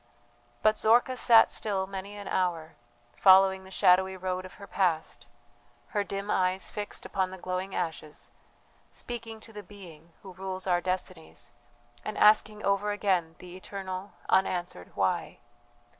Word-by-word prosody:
But 215 0 +4
Zorka 240 +3 +4
sat 235 -2 +6
still 195 -3 -1
many 195 +1 -7
an 205 - -8
hour, 170 -3 -1 0.4
following 190 0 +6
the - - -12
shadowy 190 0 +3
road 185 0 -3
of - - -16
her 200 - -11
past, 160 -11 -1 0.6
her 205 - 0
dim 200 +1 -4
eyes 185 0 0
fixed 205 -1 -6
upon 190 -1 -1
the 190 - -8
glowing 185 +1 -4
ashes, 160 -3 -4 0.6
speaking 230 -2 -6
to 225 - -13
the 210 - -7
Being 175 -5 -14
who 190 -2 -10
rules 190 0 -6
our 175 -2 +2
destinies, 120 - -5 0.5
and 215 - -5
asking 210 0 +4
over 200 +1 +1
again 185 -6 0
the 180 0 -11
eternal, 190 0 -7
unanswered 175 - 0
"Why?" - - -1
190 Hz, 145 wpm, -28 LUFS, 180-205 Hz, 0.6 s, sat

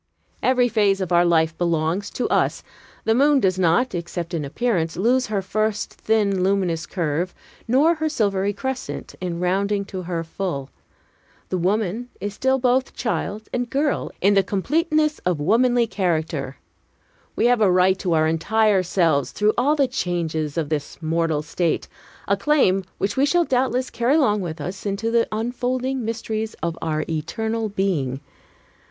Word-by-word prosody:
Every 250 -1 +3
phase 205 -4 +2
of 185 -2 -3
our 175 0 +5
life 165 -2 +2
belongs 170 +3 0
to 250 - -1
us. - - +1 0.4
The 225 - +2
moon 285 +3 +4
does 190 -5 +1
not, 180 +8 +2
except 175 0 -4
in 160 -3 -1
appearance, 165 - -1
lose 250 +6 +2
her 205 -2 -1
first 215 +2 -1
thin, 205 -4 +1
luminous 185 -4 0
curve, 170 0 -2 0.3
nor 280 +8 +4
her 315 -1 -1
silvery 200 -7 0
crescent, 260 +5 -5
in 175 -2 -3
rounding 200 +3 0
to 190 -1 -6
her 170 -2 -3
full. 160 -5 -4 0.8
The 185 - -1
woman 210 +5 -1
is 205 +1 -4
still 265 +5 +1
both 255 +1 +1
child 220 -3 -3
and 245 -1 -1
girl, 285 +3 0
in 200 +2 +4
the 195 - +5
completeness 305 - 0
of 180 -4 -1
womanly 235 +8 +3
character. 160 - -2 0.8
We - - +1
have 245 -1 +3
a 205 - +5
right 185 +1 +3
to 175 - 0
our 155 -1 +3
entire 200 +5 +2
selves, 165 -6 +1
through 210 +1 +2
all 280 +5 +2
the 280 -3 +2
changes 165 - -2
of 155 -3 -1
this 150 -2 -3
mortal 160 -2 0
state, 165 +1 -1 0.4
a 200 - +3
claim 200 -5 +2
which 200 +4 -2
we 275 +2 +4
shall 345 +3 +3
doubtless 255 -1 0
carry 240 +5 +1
along 210 -10 +3
with 165 -3 -5
us 185 +6 -6
into 210 +3 -2
the 235 0 +3
unfolding 250 +3 -2
mysteries 220 -1 -3
of 170 -1 -1
our 155 -1 -1
eternal 220 +8 -2
being. 170 -10 -1
200 Hz, 160 wpm, -22 LUFS, 170-240 Hz, 0.8 s, our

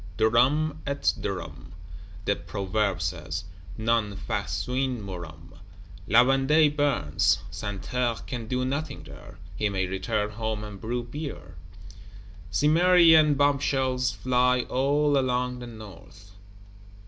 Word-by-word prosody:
Durum 140 +8 +2
et 140 0 +1
durum, 80 -9 -6 0.5
the 100 - +2
Proverb 100 -1 -2
says, 80 +1 -4 0.3
non 110 -2 0
faciunt 125 +4 -2
murum. 85 -4 -9 0.5
La 115 +4 +6
Vendée 145 +3 +3
burns; 140 - +2
Santerre 115 +4 -2
can 120 -3 -5
do 125 +2 -1
nothing 140 +2 -3
there; - - -13 0.2
he 105 - 0
may 95 -2 -1
return 105 +3 -2
home 110 0 -3
and 105 -2 -9
brew 120 +2 -2
beer. 145 +5 -7 1.0
Cimmerian 160 - +5
bombshells 135 -2 +1
fly 125 0 +2
all 140 +3 +1
along 125 -1 -1
the 120 - -8
North. 105 -2 -13
125 Hz, 110 wpm, -26 LUFS, 105-140 Hz, 1.0 s, La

